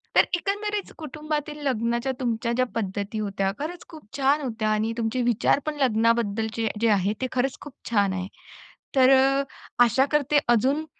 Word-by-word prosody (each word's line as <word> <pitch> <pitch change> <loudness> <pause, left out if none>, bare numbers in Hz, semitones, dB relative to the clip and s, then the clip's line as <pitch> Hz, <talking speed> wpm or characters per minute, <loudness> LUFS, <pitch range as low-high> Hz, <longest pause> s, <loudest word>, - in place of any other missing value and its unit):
तर - - +7
एकंदरीत 410 +2 -3
कुटुंबातील 305 0 -4
लग्नाच्या 235 +1 0
तुमच्या 235 -2 -1
ज्या 255 - +3
पद्धती 205 0 -3
होत्या 195 -2 -1
खरंच 340 +4 -5
खूप 315 -2 -12
छान 280 +2 +2
होत्या 225 -5 -2
आणि 215 +1 0
तुमचे 230 +2 -1
विचार 240 +2 +2
पण 305 -1 -2
लग्नाबद्दलचे 225 -2 +1
जे 230 - +3
आहे 200 -1 +2
ते 260 - 0
खरंच 255 +1 -1
खूप 290 -3 -10 0.2
छान 200 -4 +2
आहे. 185 0 -3 0.7
तर 260 -1 +6
अ, 270 +1 +4 0.4
आशा 240 +3 +3
करते 295 0 +3
अजून 260 +7 +2
245 Hz, 160 wpm, -25 LUFS, 220-285 Hz, 0.7 s, तर